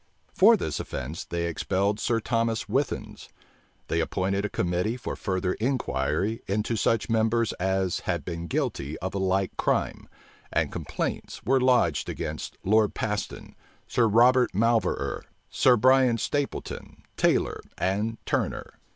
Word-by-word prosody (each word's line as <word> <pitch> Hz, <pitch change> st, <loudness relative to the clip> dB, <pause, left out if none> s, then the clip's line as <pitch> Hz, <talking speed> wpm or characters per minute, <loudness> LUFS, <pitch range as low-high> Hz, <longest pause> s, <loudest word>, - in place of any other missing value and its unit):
For -, -, +6 dB
this -, -, -3 dB
offence 75 Hz, +7 st, -5 dB
they 85 Hz, 0 st, -2 dB
expelled 100 Hz, +5 st, 0 dB
Sir 115 Hz, -1 st, +1 dB
Thomas 115 Hz, 0 st, -1 dB
Withens. -, -, -2 dB, 0.6 s
They 85 Hz, -, 0 dB
appointed 100 Hz, +4 st, -1 dB
a 105 Hz, -, -1 dB
committee 90 Hz, +7 st, -1 dB
for 125 Hz, -, -5 dB
further 95 Hz, -1 st, -1 dB
inquiry 105 Hz, -, -1 dB
into 105 Hz, +4 st, 0 dB
such 115 Hz, 0 st, +1 dB
members 115 Hz, 0 st, +1 dB
as 95 Hz, 0 st, 0 dB
had -, -, -3 dB
been 85 Hz, -1 st, -5 dB
guilty 75 Hz, -1 st, -2 dB
of 95 Hz, +1 st, -4 dB
a 100 Hz, -, -2 dB
like 95 Hz, 0 st, 0 dB
crime, -, -, -1 dB, 0.4 s
and -, -, 0 dB
complaints -, -, -4 dB
were 135 Hz, +1 st, +3 dB
lodged 125 Hz, -, +2 dB
against -, -, -5 dB
Lord 105 Hz, +1 st, +3 dB
Paston, 105 Hz, -1 st, -4 dB, 0.3 s
Sir 120 Hz, -2 st, +2 dB
Robert 125 Hz, +3 st, +4 dB
Malverer, 115 Hz, +2 st, +1 dB, 0.3 s
Sir 125 Hz, -1 st, +4 dB
Bryan 130 Hz, 0 st, +4 dB
Stapleton, 145 Hz, +5 st, -4 dB
Taylor, -, -, +1 dB, 0.2 s
and 105 Hz, +4 st, -1 dB
Turner. -, -, -2 dB
105 Hz, 135 wpm, -26 LUFS, 95-115 Hz, 0.6 s, For